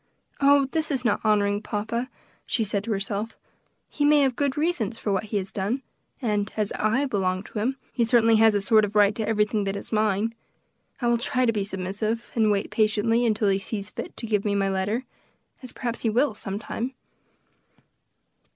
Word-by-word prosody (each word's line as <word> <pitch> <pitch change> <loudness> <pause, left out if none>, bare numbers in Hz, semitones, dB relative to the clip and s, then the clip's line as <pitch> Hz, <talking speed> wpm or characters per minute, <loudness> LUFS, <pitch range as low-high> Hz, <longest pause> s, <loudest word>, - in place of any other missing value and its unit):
"Oh! 280 0 +5
this 320 -1 0
is 265 -4 -1
not 220 - +2
honoring 205 -1 +2
papa," 225 +4 -3 0.4
she 230 - +1
said 200 -1 -1
to 230 - -3
herself; 205 +2 -3 0.5
"he 290 - -3
may 295 0 +5
have 265 -3 +2
good 280 0 -1
reasons 295 - 0
for 205 - -1
what 195 +2 -1
he 210 0 -2
has 195 -1 -3
done; 215 +8 -2 0.4
and 210 -5 -1
as 210 -2 0
I 225 +7 +1
belong 190 -6 -1
to 210 - -6
him, 255 +6 -1 0.2
he 240 - +1
certainly 230 -1 +4
has 220 -1 +5
a 205 - +1
sort 215 +1 +4
of 210 0 -3
right 205 0 +5
to 220 0 -3
everything 210 -1 +1
that 195 0 -2
is 200 - -7
mine. 215 0 +1 0.7
I 240 - +1
will 235 -1 +3
try 255 +2 +1
to 230 - +2
be 205 -2 0
submissive, 200 +4 -3
and 220 -2 +3
wait 200 -1 0
patiently 225 +2 +2
until 210 -2 +2
he 195 0 +2
sees 200 +1 -5
fit - - -7
to - - -3
give 210 -3 0
me 205 -1 0
my 195 -1 +1
letter, 195 +6 -1 0.6
as 255 - -9
perhaps 240 -2 -4
he 225 - +1
will, 245 +3 +2
some 200 -2 -5
time." 240 +4 -4
215 Hz, 200 wpm, -25 LUFS, 205-235 Hz, 0.7 s, Oh